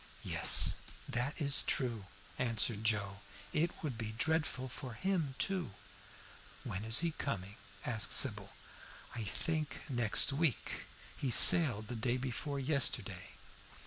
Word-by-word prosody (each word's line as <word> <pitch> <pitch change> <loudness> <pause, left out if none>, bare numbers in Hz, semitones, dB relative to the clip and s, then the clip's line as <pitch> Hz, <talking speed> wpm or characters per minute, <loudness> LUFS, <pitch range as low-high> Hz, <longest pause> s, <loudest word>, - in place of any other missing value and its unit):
"Yes, - - +6 0.3
that 125 +7 -2
is 140 -2 +2
true," 120 -7 -2 0.3
answered 115 -3 -1
Joe. 105 -3 -1 0.4
"It 165 +3 +1
would 130 -7 -5
be 110 -1 -5
dreadful 155 0 -2
for 130 -1 -9
him 165 - -2
too." 185 - -3 0.9
"When 95 +3 -5
is 110 +5 +5
he 170 -1 -1
coming?" 100 -10 -5 0.3
asked 110 -6 -2
Sybil. - - +3 0.6
"I 115 - -5
think 155 +9 -4
next 120 +2 +2
week. 145 - -2 0.3
He 135 - -4
sailed 125 - +7
the 120 - -6
day 120 +2 -2
before 135 +2 -5
yesterday." 135 -1 -2
125 Hz, 125 wpm, -33 LUFS, 110-150 Hz, 0.9 s, sailed